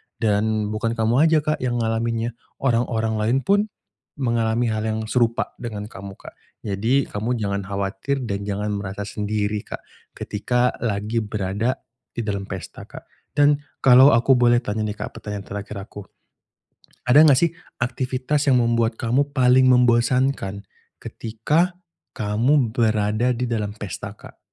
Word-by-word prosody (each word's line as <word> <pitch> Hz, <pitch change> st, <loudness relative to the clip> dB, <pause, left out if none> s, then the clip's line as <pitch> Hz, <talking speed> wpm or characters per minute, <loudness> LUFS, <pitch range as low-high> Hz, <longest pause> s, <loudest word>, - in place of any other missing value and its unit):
Dan 110 Hz, -1 st, 0 dB
bukan 115 Hz, +2 st, -2 dB
kamu 115 Hz, +7 st, +3 dB
aja 155 Hz, -2 st, +3 dB
Kak, 155 Hz, 0 st, -1 dB
yang 125 Hz, -1 st, -1 dB
ngalaminnya, 115 Hz, +1 st, -1 dB, 0.3 s
orang-orang 115 Hz, -3 st, +1 dB
lain 115 Hz, +5 st, +2 dB
pun, 200 Hz, +1 st, +3 dB, 0.6 s
mengalami 115 Hz, -2 st, 0 dB
hal 110 Hz, 0 st, -1 dB
yang 110 Hz, 0 st, -1 dB
serupa 115 Hz, +1 st, 0 dB
dengan 110 Hz, -4 st, -5 dB
kamu 95 Hz, 0 st, -9 dB
Kak. -, -, -12 dB, 0.3 s
Jadi 110 Hz, +7 st, +1 dB
kamu 110 Hz, +4 st, -1 dB
jangan 100 Hz, -2 st, -2 dB
khawatir 100 Hz, +7 st, -2 dB
dan 100 Hz, -2 st, -4 dB
jangan 105 Hz, +1 st, -2 dB
merasa 100 Hz, 0 st, -4 dB
sendiri 105 Hz, 0 st, -2 dB
Kak, -, -, -7 dB, 0.3 s
ketika 125 Hz, +4 st, 0 dB
lagi 110 Hz, 0 st, -1 dB
berada 105 Hz, +3 st, -2 dB, 0.4 s
di 120 Hz, -, -2 dB
dalam 100 Hz, -2 st, -3 dB
pesta 95 Hz, -3 st, -8 dB
Kak. -, -, -11 dB, 0.3 s
Dan 145 Hz, 0 st, +4 dB, 0.2 s
kalau 130 Hz, +1 st, +8 dB
aku 130 Hz, 0 st, +4 dB
boleh 120 Hz, -1 st, +4 dB
tanya 110 Hz, -3 st, -2 dB
nih 105 Hz, 0 st, -3 dB
Kak, -, -, -6 dB
pertanyaan 105 Hz, -1 st, -6 dB
terakhir 100 Hz, +1 st, -6 dB
aku. 100 Hz, +1 st, -8 dB, 1.0 s
Ada 145 Hz, +6 st, +6 dB
enggak 140 Hz, -4 st, +6 dB
sih 170 Hz, -, +4 dB, 0.3 s
aktivitas 130 Hz, +4 st, -1 dB
yang 125 Hz, -3 st, +4 dB
membuat 115 Hz, 0 st, +1 dB
kamu 135 Hz, +5 st, 0 dB
paling 130 Hz, -1 st, +5 dB
membosankan 125 Hz, -4 st, +2 dB, 0.4 s
ketika 150 Hz, +11 st, -1 dB, 0.4 s
kamu 120 Hz, +4 st, +1 dB
berada 110 Hz, +1 st, +1 dB
di 120 Hz, 0 st, -3 dB
dalam 105 Hz, -3 st, -2 dB
pesta 100 Hz, -1 st, -7 dB
Kak? -, -, -15 dB
115 Hz, 145 wpm, -22 LUFS, 105-125 Hz, 1.0 s, kalau